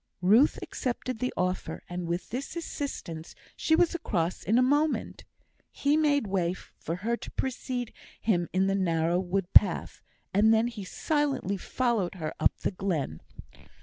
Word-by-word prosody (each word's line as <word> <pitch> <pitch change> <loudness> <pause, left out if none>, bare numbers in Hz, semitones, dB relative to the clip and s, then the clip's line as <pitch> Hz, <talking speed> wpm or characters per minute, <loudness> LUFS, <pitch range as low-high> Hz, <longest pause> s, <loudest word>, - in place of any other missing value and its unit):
Ruth 220 +11 +5
accepted 250 -1 -3
the 250 - -1
offer, 185 0 -2
and 175 -1 -4
with 170 +2 -3
this 265 +7 -4
assistance 270 - -5 0.2
she 320 - +2
was 345 0 +3
across 185 - -1
in 225 - +2
a - - +6
moment. 290 +4 +1 0.5
He 285 +1 +1
made 290 -4 +3
way 185 -3 0
for 165 - -7
her 235 +1 +2
to - - -8
precede 250 -2 -3 0.3
him 175 -6 +1
in 190 +1 +2
the 195 - +1
narrow 170 -2 +1
wood 185 0 -2
path, 185 -5 +4 0.3
and 210 +3 +5
then 225 +2 +3
silently 240 - -1
followed 220 -2 -1
her 155 -4 -4
up - - +2
the - - 0
glen. 170 - -2
205 Hz, 150 wpm, -28 LUFS, 180-255 Hz, 0.5 s, a